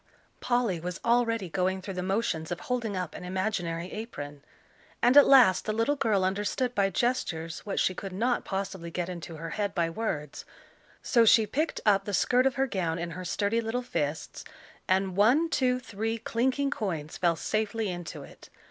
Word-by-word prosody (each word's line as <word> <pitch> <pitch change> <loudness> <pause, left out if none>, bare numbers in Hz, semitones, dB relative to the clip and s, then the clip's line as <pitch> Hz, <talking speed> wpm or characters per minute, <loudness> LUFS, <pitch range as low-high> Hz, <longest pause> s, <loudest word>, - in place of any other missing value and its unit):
Polly 240 -8 0
was 180 +2 -5
already 230 -4 +2
going 185 +2 0
through 190 +1 -6
the 180 - -3
motions 185 -4 -1
of 175 - -3
holding 235 -6 -2
up 180 -3 -4
an - - -8
imaginary 180 -2 -2
apron. 145 - -7 0.6
And 245 +3 +4
at 290 - +9
last 250 -9 +6
the 215 - -1
little 230 +7 +1
girl 220 -8 +1
understood 205 +6 -1
by 200 -3 +2
gestures 175 -7 -1
what 195 - -1
she 185 - +2
could 195 +1 -6
not 235 +7 0
possibly 190 -3 -4
get 175 +1 -3
into 170 -2 -7
her 165 +1 -6
head 205 -2 -2
by 170 -2 +1
words, 155 -8 -4 0.6
so 235 - +4
she 220 0 +6
picked 305 +9 -2
up 200 -2 +4
the 205 - -1
skirt 250 +6 +3
of 265 - -1
her 270 - +2
gown 175 -9 -2
in 170 0 -4
her 185 +3 -6
sturdy 205 +5 0
little 230 +2 -2
fists, 150 -9 -3 0.4
and 190 0 +1
one, 260 - +4
two, 250 -2 +2
three 225 -1 -3
clinking 260 +5 0
coins 165 - -3
fell 170 -2 +2
safely 215 +4 -1
into 175 -3 -6
it. - - -15
200 Hz, 185 wpm, -28 LUFS, 175-235 Hz, 0.6 s, at